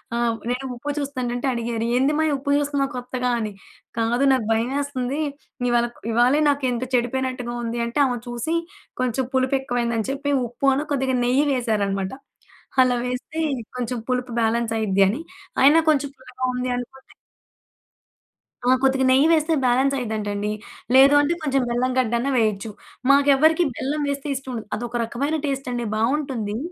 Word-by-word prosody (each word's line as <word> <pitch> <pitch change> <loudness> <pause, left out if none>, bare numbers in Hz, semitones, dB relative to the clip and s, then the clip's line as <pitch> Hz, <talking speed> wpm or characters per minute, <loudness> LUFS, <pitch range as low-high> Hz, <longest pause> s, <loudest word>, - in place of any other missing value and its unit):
ఆహ్, 235 -1 +1
నేను 250 +2 -2
ఉప్పు 290 +5 -4
చూస్తుంటంటే 255 -3 -3
అడిగేరు. 230 -1 -2
"ఏందిమ్మాయి 295 +4 +2
ఉప్పు 280 +1 -2
జూస్తున్నావు 285 -1 0
కొత్తగా" 250 0 -2
అని. 215 -2 -3 0.5
"కాదు 235 +4 +1
నాకు 255 -5 0
భయవేస్తంది. 260 +3 -1 0.5
ఇవాళ 240 0 +3 0.3
ఇవాళే 245 +6 +4
నాకేంటొ 255 -3 0
చెడిపోయినట్టుగా 250 0 -1
ఉంది." 235 +1 -3
అంటే, 235 +5 -2
ఆమె 250 -2 -1
చూసి, 240 +7 -2 0.5
కొంచెం 255 +1 0
పులుపెక్కువైందని 245 -4 0
చెప్పి, 280 +1 -2 0.2
ఉప్పు 245 +4 -2
అను 285 +3 -1
కొద్దిగా 265 -1 0
నెయ్యి 260 +4 +3
వేశారనమాట. 200 -6 0 0.7
అలా 255 -1 +3
వేస్తే 250 +5 -4 0.4
కొంచెం 245 0 -2
పులుపు 250 0 -1
బ్యాలెన్సయిద్ది 225 -3 +1
అని. 235 +10 -3 0.4
అయినా 290 +4 +7
కొంచెం 285 -2 +2
పుల్లగా 255 0 -5
ఉంది 250 0 -2
అనుకోండి. 265 +2 -9 1.6
ఆ! - - +6
కొద్దిగా 265 0 +3
నెయ్యి 270 +4 +5
వేస్తే 320 0 +3
బ్యాలెన్స్ 260 +3 +3
అయ్యిద్దంటండి. 210 -3 -2 0.4
లేదు 275 +2 +8
అంటే, 290 +3 +1
కొంచెం 275 -2 +1
బెల్లం 250 +2 0
గడ్డన్నా 240 +2 0
వెయచ్చు. 215 -1 0 0.4
మాకెవ్వరికీ 285 +4 +5
బెల్లం 295 +3 -2
వేస్తే 280 +1 -3
ఇష్టం 265 0 -6
ఉండదు. 225 -3 -6
అదొక 240 +1 -3
రకమైన 280 +7 -2
టేస్టండి. 260 -4 -2
బావుంటుందీ. 230 -3 -1
255 Hz, 135 wpm, -23 LUFS, 235-275 Hz, 1.6 s, లేదు